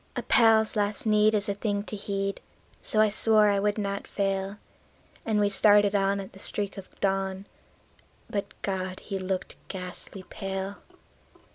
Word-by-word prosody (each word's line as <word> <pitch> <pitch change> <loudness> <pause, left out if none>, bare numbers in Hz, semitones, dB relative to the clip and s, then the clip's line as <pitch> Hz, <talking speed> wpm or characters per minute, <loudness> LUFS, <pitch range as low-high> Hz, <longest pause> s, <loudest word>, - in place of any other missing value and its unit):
A - - -3
pal's 220 -1 +4
last 205 +1 -1
need 215 0 +4
is 205 -1 0
a 200 - 0
thing 205 0 -2
to 210 - -6
heed, 195 -1 -3 0.4
so 215 - -1
I 215 0 +5
swore 215 0 +5
I 200 - +1
would 205 +1 0
not 200 -1 -3
fail; 195 0 -2 0.7
And 215 -2 +2
we 205 - +3
started 205 0 +5
on 200 0 +1
at 195 - -8
the 190 - -14
streak 205 0 -2
of 195 -2 -12
dawn; 195 0 -1 0.8
but 200 -1 -5
God! 185 -1 -3
he 195 -2 -5
looked 185 0 -4
ghastly 185 0 -4
pale. 195 0 -5
200 Hz, 160 wpm, -27 LUFS, 195-210 Hz, 0.8 s, I